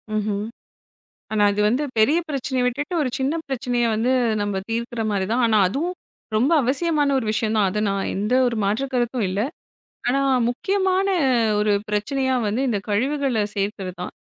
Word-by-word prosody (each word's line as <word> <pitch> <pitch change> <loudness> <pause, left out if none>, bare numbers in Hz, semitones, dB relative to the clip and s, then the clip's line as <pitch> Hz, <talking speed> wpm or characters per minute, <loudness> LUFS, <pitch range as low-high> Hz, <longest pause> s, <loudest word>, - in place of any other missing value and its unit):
ம்ஹம். 210 -1 -1 0.9
ஆனா 215 -1 +2
அது 205 - -2
வந்து 250 +6 +1 0.2
பெரிய 285 +10 +4
பிரச்சனைய 265 -3 -1
விட்டுட்டு, 290 +7 -2
ஒரு 260 - -1
சின்ன 270 +4 0
பிரச்சனைய 245 -2 -1
வந்து 235 +4 +1 0.3
நம்ம 205 -2 -2
தீர்க்கிறமாரி 225 -4 -1
தான். 250 +2 +2
ஆனா 220 -2 +3
அதுவும் 325 - -2 0.4
ரொம்ப 255 +9 +2
அவசியமான 290 +3 +1
ஒரு 230 - -3
விஷயம் 220 0 0
தான். 205 - +3
அத 210 - -3
நான் 195 0 -2
எந்த 210 +5 0
ஒரு 235 - -3
மாற்று 215 +7 0
கருத்தும் 240 -2 0
இல்ல. 195 - -1 0.7
ஆனா, 270 +3 +2 0.3
முக்கியமான 380 +8 0 0.5
ஒரு 210 0 +2 0.2
பிரச்சனையா 260 +6 0
வந்து 210 +5 -1
இந்த 215 - 0
கழிவுகள 260 +4 0 0.2
சேர்க்கிறது 195 -2 -3
தான். 180 - -5
240 Hz, 155 wpm, -22 LUFS, 210-275 Hz, 0.9 s, பெரிய